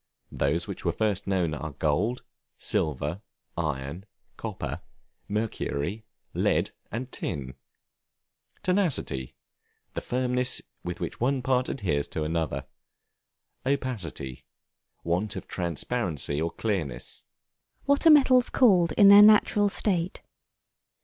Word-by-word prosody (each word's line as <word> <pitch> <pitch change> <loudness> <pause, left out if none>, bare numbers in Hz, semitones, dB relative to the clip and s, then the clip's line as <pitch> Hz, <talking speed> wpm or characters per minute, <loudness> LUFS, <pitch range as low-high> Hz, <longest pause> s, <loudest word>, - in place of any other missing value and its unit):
Those 80 +7 0
which 100 - -6
were 85 - +1
first 105 +1 0
known 90 -5 +1
are 75 0 -5
gold, 90 - 0 0.3
silver, 75 +5 -1 0.3
iron, 75 +3 -3 0.3
copper, - - -5 0.5
mercury, 105 -2 -3 0.3
lead, - - +1 0.2
and 125 +4 -4
tin. 65 -5 -4 1.1
Tenacity, 160 - 0 0.6
the - - -3
firmness 125 0 +1 0.2
with 90 0 -5
which - - -5
one 130 +1 +1
part 130 0 +1
adheres 80 - -1
to 80 - -3
another. 75 -4 -2 1.0
Opacity, 105 - -3 0.6
want 90 +5 0
of - - -7
transparency 85 - -2
or 85 - 0
clearness. 90 - -3 0.6
What 280 +3 +3
are - - +10
Metals 260 -5 +6
called 185 - +4
in 200 - +6
their 200 +1 +10
natural 210 -1 +6
state? 185 -3 -1
100 Hz, 110 wpm, -27 LUFS, -, 1.1 s, are